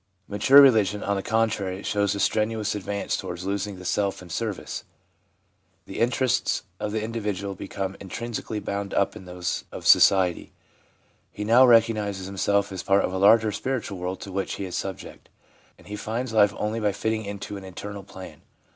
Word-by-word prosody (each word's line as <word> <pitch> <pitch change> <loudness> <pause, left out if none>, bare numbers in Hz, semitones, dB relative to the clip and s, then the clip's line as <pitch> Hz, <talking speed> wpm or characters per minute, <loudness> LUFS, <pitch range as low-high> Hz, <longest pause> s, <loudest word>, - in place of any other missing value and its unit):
Mature 115 +7 +6
religion, 110 -7 +5
on 100 - 0
the 100 - -2
contrary, 105 -4 -1
shows 100 0 0
a - - -4
strenuous 110 +1 0
advance 100 0 -3
towards 90 +1 -6
losing 100 +1 -2
the 90 - -11
self 100 +1 0
in 90 -2 -12
service. 105 +2 -4 1.0
The - - -7
interests 125 +2 +1 0.2
of 105 - -3
the 110 0 -2
individual 105 -3 -3
become 95 0 -5
inextricably 110 +2 -5
bound 100 0 -4
up 100 - +1
in 95 - -10
those 90 0 -3
of - - -8
society; 95 -3 +4 0.8
he 105 - -5
now 120 +4 +6
recognises 110 -5 +3
himself 100 +1 0
as 95 -2 -4
part 100 +1 +3
of - - -4
a 95 - -2
larger 110 +2 +5
spiritual 110 -3 -3
world 90 +1 -4
to 100 - -8
which 95 0 -2
he 100 - -4
is 90 - -6
subject; 95 -1 -6 0.5
and - - -19
he 105 - -6
finds 115 +3 -4
life 105 -2 +4
only 105 +2 -2
by 105 -2 0
fitting 110 +2 -2
into 100 0 -6
an 100 - -8
eternal 100 +2 -7
plan. 95 -1 -11
100 Hz, 175 wpm, -25 LUFS, 95-110 Hz, 1.0 s, Mature